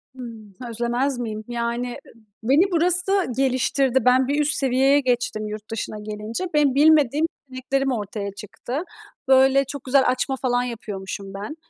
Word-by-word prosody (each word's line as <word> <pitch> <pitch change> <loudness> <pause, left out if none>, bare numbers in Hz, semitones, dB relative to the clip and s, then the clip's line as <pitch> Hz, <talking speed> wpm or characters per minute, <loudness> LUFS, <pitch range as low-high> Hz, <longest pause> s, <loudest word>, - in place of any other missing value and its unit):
Hımm. 225 -5 -10 0.2
Özlemez 240 +3 -1
miyim? 220 -2 -4
Yani, 240 +1 -2
ı - - -13 0.3
beni 295 - +3
burası 360 +3 +2
geliştirdi. 265 0 +2
Ben 255 +1 +4
bir 285 +2 0
üst 300 +1 +1
seviyeye 270 +2 +3
geçtim 245 -5 -1
yurt 215 0 -8
dışına 215 -1 -4
gelince. 215 - -5
Benim 290 -3 +3
bilmediğim 300 0 +4 0.2
yeteneklerim 270 +1 -1
ortaya 205 -3 -4
çıktı. 210 +5 -7 0.5
Böyle, 265 +1 +5
çok 280 0 -7
güzel 265 +1 +3
açma 255 +1 0
falan 245 -1 +1
yapıyormuşum 200 -4 -6
ben. 205 +10 -6
255 Hz, 145 wpm, -23 LUFS, 225-275 Hz, 0.5 s, Böyle